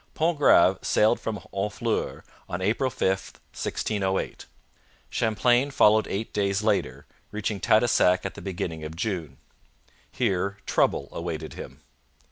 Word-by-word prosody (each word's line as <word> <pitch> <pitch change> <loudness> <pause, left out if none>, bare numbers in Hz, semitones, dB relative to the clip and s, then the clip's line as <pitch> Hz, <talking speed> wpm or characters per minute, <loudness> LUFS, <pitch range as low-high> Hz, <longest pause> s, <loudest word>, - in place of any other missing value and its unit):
Pontgrave 145 - +4
sailed 110 +3 +3
from 110 -2 -4
Honfleur 105 +4 -2 0.3
on 90 - -3
April 110 +8 +1
5, 115 - -1 0.5
1608. 95 -3 -2 0.6
Champlain 120 +4 +2
followed 110 -5 +4
eight 105 +3 -4
days 100 0 0
later, 105 -2 0 0.2
reaching 105 -1 -3
Tadoussac 110 -4 +3
at - - -3
the - - -10
beginning 90 -5 -4
of 75 +1 -6
June. 90 -3 -3 0.7
Here 100 +1 -1
trouble - - +1
awaited 85 -2 -5
him. - - -10
100 Hz, 115 wpm, -26 LUFS, 95-110 Hz, 0.7 s, Pontgrave